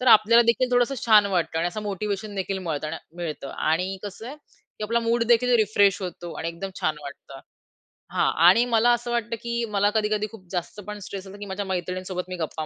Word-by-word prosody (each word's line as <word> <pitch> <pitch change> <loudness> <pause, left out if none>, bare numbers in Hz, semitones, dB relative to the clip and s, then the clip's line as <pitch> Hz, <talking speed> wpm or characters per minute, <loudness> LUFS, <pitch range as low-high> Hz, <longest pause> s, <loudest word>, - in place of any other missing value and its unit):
तर 255 - -3
आपल्याला 230 +3 +5
देखील 250 +2 +2
थोडंसं 245 +2 +3
छान 210 -2 +7
वाटतं 170 -4 0
आणि 170 +2 +1
असं 210 +4 -6
मोटिव्हेशन 205 +1 -3
देखील 195 0 -2
मिळत 160 -5 -3 0.3
मिळतं 155 -5 -5
आणि 180 +5 0
कसं 205 +2 -7
आहे, 280 - -7
की 255 -7 -12
आपला 235 +2 +1
मूडदेखील 235 +1 +3
रिफ्रेश 205 -2 +3
होतो 175 -1 -6
आणि 165 - -2
एकदम 170 +4 -6
छान 155 - 0
वाटतं. 140 -1 -10 0.7
हां - - +2
आणि 190 +7 +7
मला 235 0 +3
असं 240 0 -2
वाटतं 235 -1 -1
की 235 0 -2
मला 205 0 +3
कधी-कधी 215 0 +1
खूप 200 -5 -13
जास्त 180 +3 -4
पण 210 - -5
स्ट्रेस 195 0 -7
असतो 195 +2 -10
की 205 - -6
माझ्या 195 +1 -4
मैत्रिणींसोबत 185 0 -3
मी 185 - -4
गप्पा 160 -1 -4
200 Hz, 200 wpm, -25 LUFS, 180-230 Hz, 0.7 s, छान